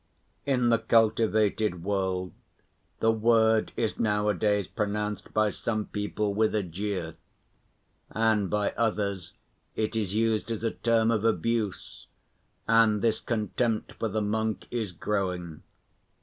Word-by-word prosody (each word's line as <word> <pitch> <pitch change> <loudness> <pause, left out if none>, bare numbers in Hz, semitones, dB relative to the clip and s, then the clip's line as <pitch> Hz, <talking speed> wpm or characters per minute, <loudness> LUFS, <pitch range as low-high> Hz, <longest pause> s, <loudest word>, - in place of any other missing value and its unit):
In 125 -3 +2
the 115 -1 +4
cultivated 110 -4 +2
world 95 -2 -1 0.7
the 115 - +4
word 110 0 +3
is 110 - -1
nowadays 105 -2 +1
pronounced 105 0 -3
by 110 -1 +2
some 110 +1 -2
people 105 0 -2
with 110 +1 +1
a 105 - +1
jeer, 90 -1 -4 0.9
and 110 -3 +1
by 105 -1 0
others 100 -5 -2 0.4
it 110 +1 -1
is 105 -3 -1
used 110 0 +1
as 115 -1 -3
a 115 - +1
term 115 -1 +2
of 110 -2 0
abuse, 115 -1 -1 0.6
and 115 -2 +4
this 115 -2 +2
contempt 115 0 -1
for 115 - 0
the 110 0 -1
monk 110 +1 -1
is 115 -5 -2
growing. 90 -3 -3
105 Hz, 125 wpm, -27 LUFS, 100-115 Hz, 0.9 s, the